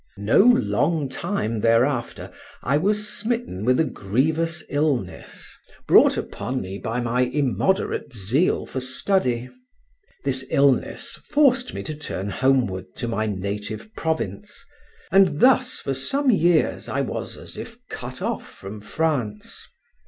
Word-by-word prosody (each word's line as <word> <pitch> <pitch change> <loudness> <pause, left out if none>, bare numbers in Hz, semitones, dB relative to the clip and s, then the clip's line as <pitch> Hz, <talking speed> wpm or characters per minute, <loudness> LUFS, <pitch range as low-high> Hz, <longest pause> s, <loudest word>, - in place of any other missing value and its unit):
No 100 +2 +3
long 170 - +3
time 115 - -2
thereafter 120 +3 +1 0.3
I 140 - +1
was 210 +7 +1
smitten 220 - -3
with 125 +2 +3
a - - +5
grievous 155 - -1
illness, 145 -3 -2 0.3
brought - - +6
upon 130 +1 -3
me 95 -1 -6
by 115 +2 -2
my 120 +1 0
immoderate 140 - 0
zeal 120 - +1
for 130 - -4
study. 130 -2 0 0.8
This 130 -1 -1
illness 140 -2 +1
forced 265 -4 +3
me - - -4
to 155 - -5
turn 100 -9 -5
homeward 125 -7 +1
to 120 - -3
my 110 -1 -1
native 105 - -4
province, 155 - -3 0.5
and 190 -5 +4
thus 255 0 +4
for 135 - -3
some 265 - +1
years 175 -5 +2
I - - 0
was - - -4
as - - -10
if - - -8
cut - - -7
off - - -3
from 100 +2 -9
France. 115 -3 -2
135 Hz, 130 wpm, -23 LUFS, 115-170 Hz, 0.8 s, brought